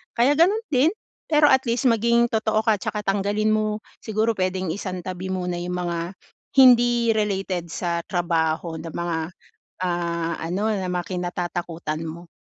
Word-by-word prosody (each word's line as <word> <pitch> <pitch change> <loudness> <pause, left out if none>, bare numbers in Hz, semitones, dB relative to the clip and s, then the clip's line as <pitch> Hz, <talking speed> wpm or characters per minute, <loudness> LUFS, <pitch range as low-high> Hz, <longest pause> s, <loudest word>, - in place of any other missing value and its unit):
Kaya 250 +5 +4
gano'n 395 +8 +3
din, 280 +4 +4 0.4
pero 300 -1 +5
at 265 -2 +4
least 240 +3 +1
maging 235 +1 +3
totoo 220 -1 +1
ka 220 -2 +3
tsaka 210 +2 -3
tanggalin 205 +2 +1
mo, 215 0 -1 0.2
siguro 220 +1 0
pwedeng 185 0 -1
isantabi 185 0 -5
muna 180 -1 -2
yung 180 0 -3
mga 170 0 -3 0.5
hindi 240 -3 +6
related 190 -5 -1
sa 170 0 -2
trabaho 165 -2 -1
na 165 +1 -7
mga, 170 0 -2 0.7
ah, 170 -2 -1
ano 190 +7 -1
na 195 -3 -2
mga 180 +1 -3
kinatatakutan 175 -3 -3
mo. 170 +2 -9
190 Hz, 145 wpm, -23 LUFS, 175-225 Hz, 0.7 s, hindi